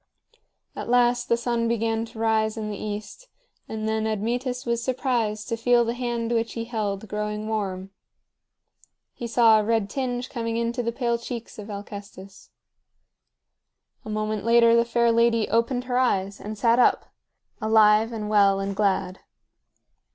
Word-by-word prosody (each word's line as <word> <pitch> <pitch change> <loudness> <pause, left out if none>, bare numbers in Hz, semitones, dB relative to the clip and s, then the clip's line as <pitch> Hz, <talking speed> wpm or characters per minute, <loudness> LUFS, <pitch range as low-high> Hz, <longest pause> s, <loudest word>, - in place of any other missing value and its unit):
At - - -6
last 245 0 +2
the 235 - +3
sun 235 -1 -1
began 225 0 0
to 230 0 -14
rise 220 0 +1
in 215 -1 -4
the - - -4
east, 215 - -6 0.4
and 220 0 -4
then 220 0 0
Admetus 245 +4 -2
was 235 -1 -1
surprised 235 -5 -1
to 230 - 0
feel 240 +1 +3
the 230 - -1
hand 240 -2 -3
which 230 -1 0
he 230 - -4
held 215 -3 -3
growing 210 +1 -3
warm. 195 -3 -3 1.2
He 240 - -6
saw 225 -2 +5
a - - 0
red 220 -2 0
tinge 250 -2 -2
coming 230 -3 -3
into 235 +1 -1
the 235 -1 -2
pale 235 -1 -1
cheeks 235 -2 -7
of 210 +1 -8
Alcestis. 200 -1 -9 1.5
A - - -9
moment 215 0 -2
later 230 0 +5
the 235 0 +4
fair 235 0 +2
lady 230 -1 +3
opened 235 +3 +1
her 250 0 0
eyes 200 -5 0
and 215 +1 -7
sat 230 +2 +3
up, - - +2 0.5
alive 215 0 +4
and 215 -2 -4
well 200 -2 +4
and 195 0 -3
glad. 195 -2 0
225 Hz, 160 wpm, -25 LUFS, 210-235 Hz, 1.5 s, saw